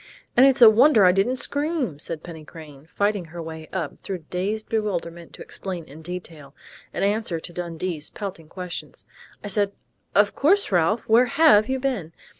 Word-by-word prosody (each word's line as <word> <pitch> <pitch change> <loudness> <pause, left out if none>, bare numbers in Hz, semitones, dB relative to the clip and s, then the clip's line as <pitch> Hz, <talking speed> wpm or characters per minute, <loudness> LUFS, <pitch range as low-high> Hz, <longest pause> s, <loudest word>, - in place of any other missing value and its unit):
and 260 +3 +7
it's 265 -2 +4
a - - +11
wonder 225 -2 +5
I 180 - +7
didn't 195 +7 +1
scream," 285 - -2
said 165 +1 -3
Penny 165 -3 -9
Crain, 150 -2 -13
fighting 205 +1 -1
her 170 +2 -10
way 160 -1 -8
up 170 -6 -4
through 180 -5 -6
dazed 205 +4 -2
bewilderment 175 -6 -3
to - - -9
explain 180 -4 -6
in 155 +3 -13
detail, 160 -5 -8 0.4
in - - -3
answer 200 -4 0
to 175 - -10
Dundee's 170 -2 -3
pelting 180 -6 -7
questions. 180 -1 -7 0.4
"I - - -5
said, 200 0 0 0.4
'Of 205 0 +4
course, 385 - +2
Ralph.... 180 +5 +2
Where 230 +3 +5
have 270 -6 +5
you 265 0 0
been?...' 240 - -3
185 Hz, 175 wpm, -23 LUFS, 165-220 Hz, 0.4 s, a